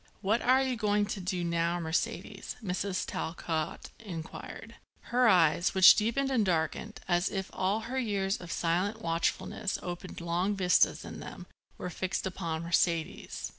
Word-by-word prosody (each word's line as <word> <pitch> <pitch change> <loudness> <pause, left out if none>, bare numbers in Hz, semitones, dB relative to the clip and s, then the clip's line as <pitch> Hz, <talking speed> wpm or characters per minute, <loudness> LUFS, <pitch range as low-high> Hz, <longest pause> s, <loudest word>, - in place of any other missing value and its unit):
"What 215 +5 +1
are 260 +2 +4
you 260 -2 -1
going 210 -1 +2
to 205 - -4
do 180 -1 -2
now, 170 0 0
Mercedes?" 160 -1 -3
Mrs. 185 0 -2
Talcott 160 -1 -3
inquired. 200 +3 -8 0.4
Her 250 0 +5
eyes, 175 -2 +4
which 190 -1 +10
deepened 235 +6 0
and 240 -5 +3
darkened, 180 +4 -1
as 175 0 +2
if 195 -1 -4
all 195 +4 0
her 255 +4 -3
years 200 -5 0
of 175 -2 -9
silent 185 +6 0
watchfulness 165 +4 -1
opened 175 +1 -6
long 175 +4 0
vistas 180 -2 +3
in - - -8
them, - - -9 0.3
were 180 - -5
fixed 185 +3 -2
upon 170 -4 -3
Mercedes. 170 -1 0
185 Hz, 150 wpm, -30 LUFS, 170-210 Hz, 0.4 s, which